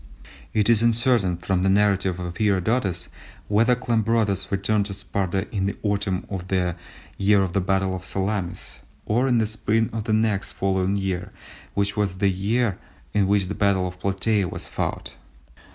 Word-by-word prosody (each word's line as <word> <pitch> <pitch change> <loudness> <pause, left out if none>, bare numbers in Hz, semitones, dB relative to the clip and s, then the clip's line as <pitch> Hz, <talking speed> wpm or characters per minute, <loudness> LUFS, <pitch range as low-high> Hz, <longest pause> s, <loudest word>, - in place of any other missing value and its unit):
It 105 -2 +2
is 115 -2 +5
uncertain 115 -5 +2
from 90 +1 -1
the 95 - +2
narrative 95 -2 +2
of 90 -1 -5
Herodotus 100 -3 +1 0.4
whether 115 +4 +4
Cleombrotus 115 -5 0
returned 100 +1 +1
to 100 - -6
Sparta 95 -1 -2
in 95 -1 +1
the 100 - -3
autumn 100 -2 -1
of 95 -2 -5
the 90 -2 0 0.4
year 100 0 +4
of 90 -2 -3
the 95 - +2
battle 95 0 0
of 90 - -7
Salamis, 95 -1 -3 0.3
or 120 +5 +2
in 125 -2 +3
the 110 - +3
spring 110 +1 0
of 110 -2 -3
the 110 - 0
next 110 -2 +1
following 95 0 0
year 95 0 -2 0.4
which 100 0 0
was 100 -3 0
that 100 +3 +1 0.4
in 100 -2 +3
which 100 -1 +2
the 100 - -3
battle 100 -3 +2
of 90 0 -9
Platæa 100 0 0
was - - -6
fought. - - -4
100 Hz, 170 wpm, -24 LUFS, 95-110 Hz, 0.4 s, is